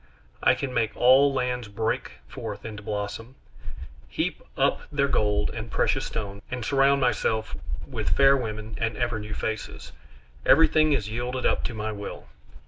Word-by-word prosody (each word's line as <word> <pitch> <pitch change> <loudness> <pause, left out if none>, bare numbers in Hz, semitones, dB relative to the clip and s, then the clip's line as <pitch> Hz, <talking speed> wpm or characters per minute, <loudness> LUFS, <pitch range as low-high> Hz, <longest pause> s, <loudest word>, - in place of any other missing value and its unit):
I - - +5
can 135 -2 -4
make 110 -2 0
all 130 +3 +6
lands 125 -3 -1
break 100 -8 -2
forth - - -7
into 105 -2 -6
blossom, 105 +4 -5 0.7
heap - - -2 0.2
up - - +2
their 140 -1 +2
gold 105 -5 +1
and 115 0 -6
precious - - +1
stones, 100 -3 -5
and 125 -2 -4
surround 140 0 +4
myself 110 -3 0 0.3
with - - -3
fair 135 0 +7
women 110 -3 -4
and 115 0 -1
ever 120 -2 -1
new 105 0 -6
faces; 110 0 -4 0.5
everything 155 -1 +5
is 110 -7 0
yielded 125 +3 -3
up - - +2
to 120 - -3
my 110 0 -3
will. 100 -1 -7
115 Hz, 155 wpm, -26 LUFS, 105-130 Hz, 0.7 s, fair